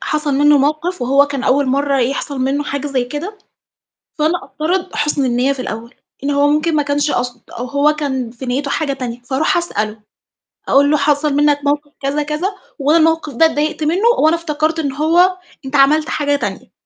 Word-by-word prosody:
حصل 300 -2 -1
مِنّه 290 +1 +5
موقِف 305 +3 -1
وهو 275 +3 +4
كان 280 -2 -4
أول 275 +2 +2
مَرّة 275 +1 +1
يحصل 275 +2 -2
مِنّه 270 +3 0
حاجة 285 0 -3
زي 265 -3 -1
كده، 315 - -6 0.8
فأنا 315 +3 0
أفترض 360 +4 -3
حُسن 295 -1 0
النيّة 250 +2 +1
في 275 - -6
الأول، 230 0 -7 0.3
إن 285 - 0
هو 285 0 +3
ممكن 310 +2 +1
ما 295 - +3
كانش 290 +1 0
قاصد 245 -2 -2
أو 245 - -6
هو 285 +3 +2
كان 265 -5 -3
في 250 +2 -9
نيته 275 +3 -2
حاجة 290 -2 -1
تانية، 245 -3 -5
فأروح 265 +7 0
أسأله 215 -11 -2 0.7
أقُول 285 +1 +4
له: 300 - +4
"حصل 290 +1 +1
مِنّك 290 0 +3
موقِف 290 0 -1
كذا 280 +2 -1
كذا، 300 +5 -2 0.3
وأنا 295 +4 +3
الموقِف 320 -2 +1
ده 285 +7 +4
اتضايقت 310 0 -1
مِنّه 355 +9 +2
وأنا 315 +2 +4
افتكرت 315 -1 -1
إن 285 -3 -1
هو 345 +6 +3 0.3
أنت 265 - -4
عملت 295 +3 +4
حاجة 290 -1 0
تانية."، 285 - -5
290 Hz, 190 wpm, -17 LUFS, 275-305 Hz, 0.8 s, مِنّه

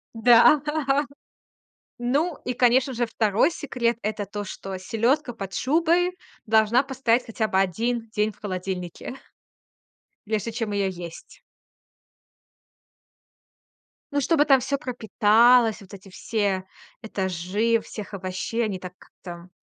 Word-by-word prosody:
Да. 240 +5 +6 1.4
Ну, 285 +7 0
и 250 - -1
конечно 250 +2 +3
же, 240 0 0
2 220 - +2
секрет- 245 -7 -2
это 210 -1 -2
то, 205 +1 -5
что 190 -1 -7
селёдка 240 +8 0
под 195 -4 -7
шубой 340 +5 +1 0.3
должна 220 +4 +3
постоять 255 -3 0
хотя 225 -1 -2
бы 190 - -1
1 225 +5 -1
день 215 0 0
в - - -24
холодильнике 185 +2 -5 1.1
прежде 220 +1 -2
чем 225 -2 -3
её 200 -1 0
есть. 175 -2 -10 2.7
Ну, 285 - +1
чтобы 295 +1 +3
там 270 -2 +5
всё 280 +3 -2
пропиталось, 235 -2 +3
вот 195 +1 -15
эти 195 0 -12
все 195 -1 -2 0.4
этажи 200 +3 -1
всех 210 -1 -9
овощей, 190 +5 -3
они, 195 -3 -3
так, 180 0 -8
как-то 175 0 -12
225 Hz, 120 wpm, -24 LUFS, 195-250 Hz, 2.7 s, Да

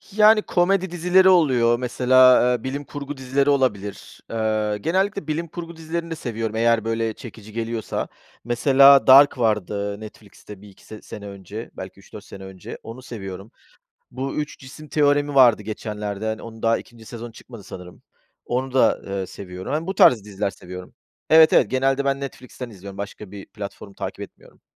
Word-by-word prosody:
Yani, 215 0 +6
komedi 190 -1 +1
dizileri 180 +2 +4
oluyor 125 -10 +3
mesela, 130 +1 +5
eee, 120 - -3
bilim 140 +2 -4
kurgu 145 0 -7
dizileri 135 +2 0
olabilir. 110 -8 -1
Eee, 110 -2 -1
genellikle 190 - -1
bilim 160 +2 -2
kurgu 170 +1 -8
dizilerini 165 +1 -5
de - - -2
seviyorum. 115 -6 -4
Eğer, 115 -1 +2
böyle, 115 0 -1
çekici 110 -3 -12
geliyorsa 115 0 -3 0.4
mesela 135 +3 +5
Dark 140 +1 +8
vardı, 105 -3 -1
Netflix'te 105 -2 -13
1-2 100 -2 -17
se 110 -1 -11
sene 105 -1 -9
önce, 100 +3 -8
belki 95 +1 -9
3-4 100 +1 -12
sene 95 0 -11
önce. 95 -1 -9
Onu 115 +3 -9
seviyorum. 95 -4 -8 0.6
Bu 130 +2 -4
Üç 150 0 -4
Cisim 145 +3 -12
Teoremi 145 -1 +1
vardı 120 -5 +6
geçenlerde, 105 -1 -5
hani, 110 0 -3
onu 115 -1 -11
daha 115 0 +2
2. 115 -2 -13
sezon 115 0 -8
çıkmadı 115 -2 -13
sanırım, 90 -2 -11 0.4
onu 130 +1 -2
da, 130 - +3
eee, 100 -1 -3
seviyorum. 90 +4 -7
Yani 160 +3 -2
bu 190 - -3
tarz 115 - +5
diziler 100 -1 -3
seviyorum. 90 -1 -10 0.4
Evet, 160 +1 +7
evet. 115 - +4
Genelde 135 +1 +1
ben 140 0 0
Netflix'ten 130 -2 -8
izliyorum. 100 -2 -11
Başka 100 0 -7
bir 100 -1 -9
platform 100 -1 -9
takip - - -6
etmiyorum. - - -13
115 Hz, 165 wpm, -22 LUFS, 105-140 Hz, 0.6 s, Dark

